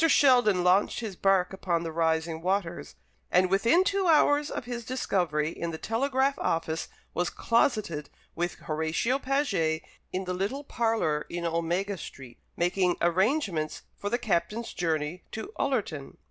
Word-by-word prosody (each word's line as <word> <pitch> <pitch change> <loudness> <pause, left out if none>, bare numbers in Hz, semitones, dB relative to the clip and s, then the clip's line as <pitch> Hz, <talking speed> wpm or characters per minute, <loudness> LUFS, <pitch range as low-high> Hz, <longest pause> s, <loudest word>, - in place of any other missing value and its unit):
Sheldon 245 - +5
launched 185 +6 +3
his 215 -5 -5
bark 190 -1 +2
upon 175 -3 -1
the 165 - -4
rising 160 0 0
waters, 180 -1 -2 0.3
and 180 +1 +3
within 230 - +4
two 390 -1 +1
hours 295 -2 +4
of - - -5
his 240 -1 -5
discovery 175 - 0
in 170 - -4
the 160 - -5
telegraph 265 - 0
office 165 -1 -1 0.3
was 175 0 0
closeted 215 - 0 0.2
with 175 +1 -2
Horatio 160 - -1
Paget 200 - 0 0.3
in 185 +1 -2
the 180 - -2
little 205 +10 -2
parlour 225 - 0
in 170 0 -4
Omega 170 +4 -1
Street, 125 -6 -10 0.2
making 180 +1 +1
arrangements 180 - +1
for 205 - -4
the 240 - +1
Captain's 215 +1 -1
journey 160 0 -1
to 395 - -6
Ullerton. 205 - -2
185 Hz, 145 wpm, -28 LUFS, 165-235 Hz, 0.3 s, Sheldon